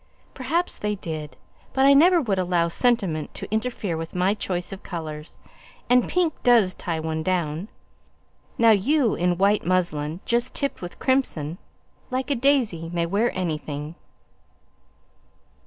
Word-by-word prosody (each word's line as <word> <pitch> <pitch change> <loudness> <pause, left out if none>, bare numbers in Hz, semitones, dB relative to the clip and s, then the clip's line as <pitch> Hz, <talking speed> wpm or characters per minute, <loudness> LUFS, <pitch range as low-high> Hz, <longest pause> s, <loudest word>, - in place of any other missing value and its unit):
"Perhaps 320 +7 -1
they 210 0 -1
did. 155 -5 -6 0.4
But 265 0 +3
I 280 - +7
never 345 +5 +6
would 210 - 0
allow 175 -2 +1
sentiment 190 -7 0
to - - -6
interfere 220 -5 -2
with 165 +2 -6
my 180 +2 +2
choice 180 -4 -3
of 195 - -9
colours; 155 -3 -7 0.5
and 250 0 +4
pink 350 -4 +1
does 230 -7 +4
tie 165 -3 -4
one 160 0 -3
down. 170 0 -1 0.9
Now 230 -1 +6
you, 235 +4 +3
in 175 0 0
white 200 +2 +3
muslin, 170 -3 0
just 240 +2 0
tipped 280 -1 -2
with 175 -1 -7
crimson, 180 - 0 0.5
like 255 +1 -2
a - - +3
daisy, 235 - +1
may 170 -1 0
wear 205 +7 +1
anything." 155 -3 -4
185 Hz, 140 wpm, -24 LUFS, 165-245 Hz, 0.9 s, I